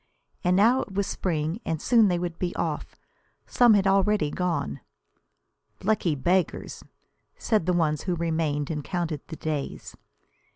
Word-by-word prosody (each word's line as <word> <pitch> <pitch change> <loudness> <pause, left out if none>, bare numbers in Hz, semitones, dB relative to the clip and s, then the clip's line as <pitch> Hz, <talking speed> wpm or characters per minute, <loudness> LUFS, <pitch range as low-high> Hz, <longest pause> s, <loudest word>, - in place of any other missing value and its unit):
And 180 0 +3
now 230 +7 +4
it 195 - -8
was 200 0 +1
spring, 165 +3 -2
and 160 -1 -2
soon 230 +1 +4
they 180 -2 +1
would 170 -1 -4
be 180 -1 -2
off. 160 -3 -3 0.5
Some 240 -4 +5
had 200 -1 +2
already 195 -5 +2
gone. 170 - -2 1.0
"Lucky 190 -6 +1
beggars!" 175 +7 -1 0.5
said 215 -7 0
the 180 - +3
ones 155 -3 +1
who 180 -2 0
remained, 160 -3 -1
and 150 -2 -3
counted 170 -4 -3
the - - -7
days. 150 -3 -4
175 Hz, 150 wpm, -26 LUFS, 155-195 Hz, 1.0 s, Some